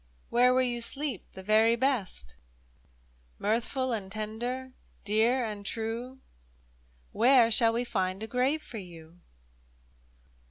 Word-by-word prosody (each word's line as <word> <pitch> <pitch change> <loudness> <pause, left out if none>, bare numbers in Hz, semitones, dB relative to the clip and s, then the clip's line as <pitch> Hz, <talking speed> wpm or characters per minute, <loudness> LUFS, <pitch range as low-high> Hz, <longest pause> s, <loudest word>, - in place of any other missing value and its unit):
Where 250 +1 +5
will 255 0 +3
you 240 -1 -2
sleep 270 -2 -3
the 190 - -9
very 220 +3 +4
best? 210 - -2 1.0
Mirthful 240 +4 -1
and 195 -4 -4
tender, 240 +5 -4 0.3
dear 225 +5 +2
and 210 -2 -6
true 230 +5 -4 0.5
— - - -35
Where 245 -2 +6
shall 225 +1 +4
we 235 +1 0
find 190 -3 -2
a - - -2
grave 260 +6 0
for 225 - -8
you 170 -2 -13
225 Hz, 125 wpm, -29 LUFS, 195-250 Hz, 1.0 s, Where